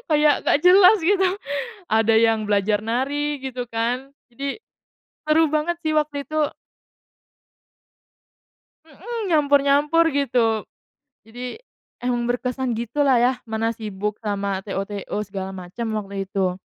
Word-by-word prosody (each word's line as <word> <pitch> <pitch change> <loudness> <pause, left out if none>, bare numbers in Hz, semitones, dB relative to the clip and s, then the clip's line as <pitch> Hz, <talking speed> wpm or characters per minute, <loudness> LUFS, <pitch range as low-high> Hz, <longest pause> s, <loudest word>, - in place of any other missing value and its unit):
kayak 300 -1 +4
nggak - - +3
jelas 385 +3 +8
gitu. 380 +2 +3 0.6
Ada 225 0 +3
yang 225 -1 +3
belajar 205 0 +1
nari, 285 +5 -1
gitu 255 -2 -4
kan. 245 +4 -2 0.2
Jadi, 275 - -4 0.7
seru 320 +1 +4
banget 320 +3 0
sih 310 0 0
waktu 295 -2 0
itu. 310 -1 0 2.3
Mhm, 410 - -6
nyampur-nyampur, 290 +1 +3
gitu. 235 -6 +1 0.6
Jadi, 245 - -7 0.4
emang 240 -1 0
berkesan 250 0 -2
gitu 240 +5 -1
lah 260 -2 +5
ya, 250 +1 +4
mana 225 +1 -1
sibuk 210 -1 -4
sama 200 -2 -2
TO-TO 195 +1 -4
segala 190 -1 -5
macam, 185 +6 -6
waktu 195 -1 -5
itu. 190 -2 -1
250 Hz, 120 wpm, -22 LUFS, 215-295 Hz, 2.3 s, jelas